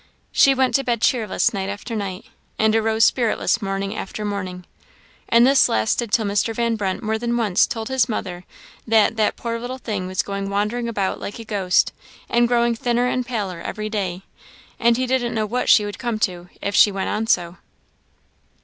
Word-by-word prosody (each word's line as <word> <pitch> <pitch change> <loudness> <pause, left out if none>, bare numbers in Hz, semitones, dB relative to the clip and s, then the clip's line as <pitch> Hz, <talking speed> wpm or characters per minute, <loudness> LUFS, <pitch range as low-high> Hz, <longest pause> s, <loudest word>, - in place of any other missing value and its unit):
She 275 -1 +5
went 260 -1 +2
to 275 - +2
bed 240 -3 0
cheerless 230 0 +1
night 195 -1 -3
after 205 +3 -5
night, 195 -1 -4 0.3
and 220 0 +3
arose 220 0 +3
spiritless 235 -1 +1
morning 195 +1 -3
after 210 +1 -5
morning; 185 -3 -4 0.6
and 235 +1 +6
this 275 +1 +5
lasted 110 - 0
till 220 +1 +2
Mr. 205 +3 0
Van 235 0 0
Brunt 200 +1 -3
more 220 0 -1
than 240 0 -1
once 210 -6 +3
told 225 -4 -4
his 265 -2 +1
mother 180 -5 -4 0.4
that 220 0 +4
"that 215 -1 +1
poor 230 -1 -4
little 245 +2 -5
thing 205 -7 -4
was 185 0 -1
going 200 0 -4
wandering 210 +4 -1
about 200 -4 -2
like 205 - -6
a 230 - -9
ghost, 195 -4 +1 0.4
and 240 0 +3
growing 235 0 +2
thinner 240 +1 0
and 250 0 -1
paler 200 -8 -3
every 215 +3 -5
day; 190 -4 -3 0.6
and 235 0 +3
he 255 - 0
didn't 245 -2 0
know 215 -1 0
what 245 +4 -2
she 210 - +6
would 205 -1 -6
come 235 -2 -2
to 180 -3 -2
if 200 - -2
she 205 - +6
went 195 -1 -3
on 220 +1 -2
so." 175 -3 +1
220 Hz, 195 wpm, -21 LUFS, 200-235 Hz, 0.6 s, and